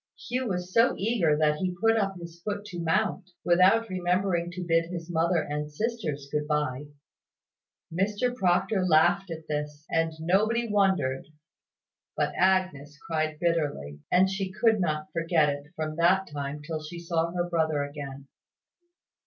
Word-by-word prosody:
Hugh 250 +1 -1
was 180 -2 -3
so 230 +2 +4
eager, 195 -8 +2
that 150 -1 +2
he 180 +1 -2
put 225 +2 +4
up 195 -3 0
his 170 0 -10
foot 205 +1 -4
to 180 -4 -7
mount, 185 +2 0 0.2
without 185 +6 +4
remembering 180 -1 0
to 180 +1 -6
bid 165 0 +3
his 175 -1 -6
mother 165 0 +2
and 150 0 -4
sisters 160 -7 -3
good 150 0 -1
bye. 150 -2 -1 1.1
Mr 205 +7 0
Proctor 185 0 +2
laughed 175 +3 +3
at 160 -1 -7
this; 150 0 -4
and 165 0 +1
nobody 215 +8 +2
wondered; 190 -11 +1 0.9
but - - 0
Agnes 185 -6 +1
cried 155 -2 -1
bitterly; 145 - -1
and 185 +1 +5
she 190 0 -3
could 220 +2 +2
not 155 -3 -1
forget 165 -2 +2
it, 145 0 -4
from 155 0 -4
that 185 +3 +4
time 145 0 -5
till 155 0 -4
she 155 +3 -8
saw 170 -1 -1
her 175 -1 -1
brother 160 -4 +1
again. 140 -1 -7
170 Hz, 155 wpm, -27 LUFS, 150-190 Hz, 1.1 s, and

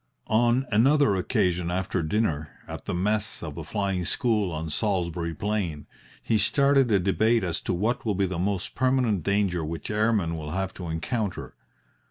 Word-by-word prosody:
On 120 +3 +3
another 125 +1 +4
occasion 90 -1 0
after 95 0 -1
dinner, 80 -4 0 0.2
at - - -7
the - - -3
mess 105 +3 -1
of 75 -3 -5
the 85 - -6
Flying 95 +1 -1
School 105 0 0
on 80 0 -4
Salisbury 85 -4 -1
Plain, 100 -8 -2 0.4
he 110 - +2
started 135 +3 +3
a 100 - +5
debate 110 +4 +2
as 85 -3 -2
to - - -2
what 110 +7 0
will 105 -3 0
be 100 +1 +2
the 90 -2 -3
most 95 +1 -1
permanent 125 -7 +2
danger 100 -2 +1
which 80 +5 -5
airmen 105 -6 +1
will 75 -2 -5
have 95 0 -2
to 90 - -7
encounter. 95 +5 -3
100 Hz, 170 wpm, -26 LUFS, 85-110 Hz, 0.4 s, a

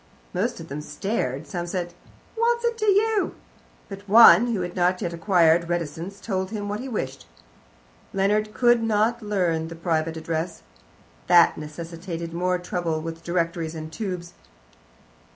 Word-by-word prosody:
Most - - -1
of - - -9
them 145 +2 -5
stared, 150 - -3
some 175 +1 -4
said, 175 -1 -3 0.4
"What's 470 +1 +1
that 470 0 +1
to 430 - 0
you?" 420 +1 +2 0.5
but 200 0 -10
one, 225 0 +8
who 225 -6 -1
had 175 0 -5
not 180 0 +2
yet 175 -4 -3
acquired 170 -1 +3
reticence, 175 +3 -4
told 190 -3 -2
him 205 -1 -4
what 205 +1 -3
he 265 +2 -6
wished. 135 - -4 0.8
Leonard 210 +2 +1
could 240 +1 +3
not 225 +2 +1
learn 180 -6 0
the 165 - -8
private 165 -1 -1
address. 160 - -4 0.6
That - - +6
necessitated 165 +2 -7
more 180 +1 0
trouble 175 -2 -2
with 165 +1 -7
directories 170 -2 -2
and 160 0 -7
tubes. 180 -2 -5
180 Hz, 150 wpm, -24 LUFS, 165-210 Hz, 0.8 s, one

